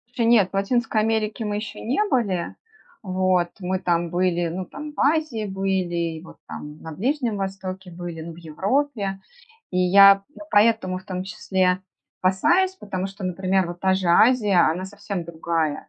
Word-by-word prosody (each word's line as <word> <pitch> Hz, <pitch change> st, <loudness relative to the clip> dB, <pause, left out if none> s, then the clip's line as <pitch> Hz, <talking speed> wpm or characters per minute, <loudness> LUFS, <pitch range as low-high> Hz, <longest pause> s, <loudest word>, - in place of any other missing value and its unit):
Еще 235 Hz, -, +1 dB
нет. 225 Hz, -5 st, +5 dB
В -, -, -42 dB
Латинской 220 Hz, +2 st, +1 dB
Америке 220 Hz, 0 st, -1 dB
мы 210 Hz, -1 st, -2 dB
еще 210 Hz, 0 st, -6 dB
не 250 Hz, -, -1 dB
были. 200 Hz, -, -1 dB, 0.5 s
Вот, 185 Hz, -2 st, +1 dB
мы 185 Hz, 0 st, -2 dB
там 170 Hz, -1 st, 0 dB
были, 175 Hz, -1 st, +1 dB
ну, 180 Hz, +3 st, -4 dB
там 295 Hz, +1 st, -8 dB
в -, -, -10 dB
Азии 285 Hz, -7 st, +1 dB
были, 185 Hz, -4 st, -1 dB
и -, -, -10 dB
вот -, -, -14 dB
там 150 Hz, 0 st, -8 dB
на 160 Hz, -, -8 dB
Ближнем 245 Hz, -, -1 dB
Востоке 190 Hz, -1 st, -5 dB
были, 170 Hz, -1 st, -7 dB
ну, 165 Hz, +1 st, -7 dB
в 160 Hz, -, -15 dB
Европе. 195 Hz, -, -1 dB, 0.5 s
И 180 Hz, -, -1 dB
я 195 Hz, +2 st, +8 dB
п 195 Hz, -, -18 dB, 0.3 s
поэтому 205 Hz, -3 st, +3 dB
в 185 Hz, -, -16 dB
том 185 Hz, -1 st, -4 dB
числе 190 Hz, -2 st, 0 dB, 0.4 s
опасаюсь, 325 Hz, -, +3 dB
потому 190 Hz, -, -4 dB
что, 195 Hz, +1 st, -10 dB
например, 185 Hz, 0 st, 0 dB
вот 175 Hz, 0 st, -8 dB
та 190 Hz, 0 st, +2 dB
же 190 Hz, -2 st, -1 dB
Азия, 210 Hz, -1 st, +5 dB
она 185 Hz, +3 st, -3 dB
совсем 200 Hz, -2 st, -5 dB
другая. 165 Hz, -2 st, -2 dB
190 Hz, 175 wpm, -23 LUFS, 180-215 Hz, 0.5 s, я